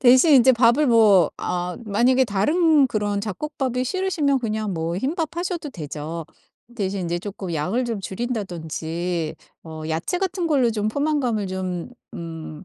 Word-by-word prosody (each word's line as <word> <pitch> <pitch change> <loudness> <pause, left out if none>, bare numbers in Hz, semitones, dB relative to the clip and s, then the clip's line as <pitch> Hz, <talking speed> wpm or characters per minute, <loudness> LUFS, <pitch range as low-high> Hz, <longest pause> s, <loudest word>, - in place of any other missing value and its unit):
대신 260 +5 +6
인제 260 0 +7
밥을 240 +5 +4
뭐 210 - +5
아 180 0 -2
만약에 240 +5 +3
다른 295 - +3
그런 205 -4 -1
잡곡밥이 255 +4 -2
싫으시면 310 -5 0
그냥 215 -3 -2
뭐 165 +1 -2
흰밥 315 - -2
하셔도 345 -3 -3
되죠. 155 - -6 0.5
대신 195 -3 -2
인제 175 0 -2
쪼끔 190 -3 -5
양을 185 +12 0
좀 230 -4 -3
줄인다든지 175 -6 -3 0.3
어 160 -1 -8
야채 165 - -1
같은 375 -2 -1
걸로 265 -6 +3
좀 215 -1 -1
포만감을 260 -5 0
좀 185 +2 -4 0.2
음 165 -1 -7
215 Hz, 290 characters per minute, -23 LUFS, 175-265 Hz, 0.5 s, 인제